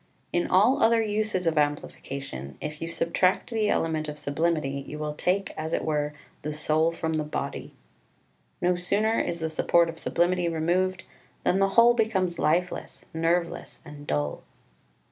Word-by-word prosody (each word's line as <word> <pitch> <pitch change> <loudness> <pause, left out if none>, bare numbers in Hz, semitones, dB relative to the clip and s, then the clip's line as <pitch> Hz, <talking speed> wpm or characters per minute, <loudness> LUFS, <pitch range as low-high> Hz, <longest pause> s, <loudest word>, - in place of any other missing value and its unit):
In 175 - +1
all 215 +9 +4
other 230 0 +5
uses 210 -3 -1
of 165 -2 +2
amplification, 140 - -3
if 150 0 -6
you 165 - -3
subtract 175 +5 +1
the 220 -2 +1
element 155 -2 0
of 150 - -6
sublimity 145 -1 -1
you 150 - -6
will 150 0 -3
take 185 +5 -1
as 160 +1 -4
it - - 0
were 150 -1 -1 0.3
the 150 - -3
soul 155 +2 +2
from 160 -1 -3
the 155 -1 0
body. 150 - -5 0.9
No 180 0 +3
sooner 205 +5 +1
is 170 0 -2
the 160 - -1
support 170 +1 +3
of 165 0 -7
sublimity 175 0 +1
removed 175 +3 0 0.4
than 190 - +2
the 195 0 +3
whole 235 +1 +8
becomes 195 -7 0
lifeless, 175 +4 -1
nerveless, 170 +1 -1
and 145 -1 -11
dull. 75 0 -1
165 Hz, 160 wpm, -27 LUFS, 150-185 Hz, 0.9 s, whole